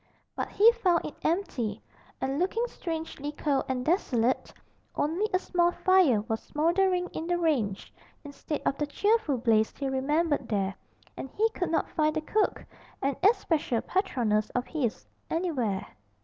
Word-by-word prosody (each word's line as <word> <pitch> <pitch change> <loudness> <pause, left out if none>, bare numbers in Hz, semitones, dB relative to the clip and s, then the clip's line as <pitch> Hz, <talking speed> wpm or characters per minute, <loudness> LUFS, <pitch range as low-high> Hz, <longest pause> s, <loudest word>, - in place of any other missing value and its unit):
But - - -3
he 440 +3 +6
found 370 -8 +1
it - - -5
empty, 250 - -1 0.4
and 270 +2 -1
looking 415 +7 +1
strangely 320 - -5
cold 285 -2 0
and 250 -1 -1
desolate; 260 - +1 0.4
only 345 +9 0
a 370 - +3
small 350 -2 +1
fire 360 - +4
was 220 0 -3
smouldering 360 +4 +1
in 325 - -5
the 350 0 +1
range, 255 - -1 0.3
instead 290 +1 -5
of 275 - 0
the 295 - 0
cheerful 405 - +1
blaze 220 -2 +2
he 275 - -2
remembered 290 +1 0
there, 195 -3 0 0.4
and 270 - -6
he 435 +11 +2
could 360 -5 -2
not 325 - +1
find 310 0 +1
the 315 - 0
cook 425 +7 0 0.4
an 275 0 +1
especial 325 - +2
patroness 235 - 0
of 250 0 0
his 265 -9 -2 0.2
anywhere. 265 - -1
305 Hz, 150 wpm, -28 LUFS, 250-360 Hz, 0.4 s, he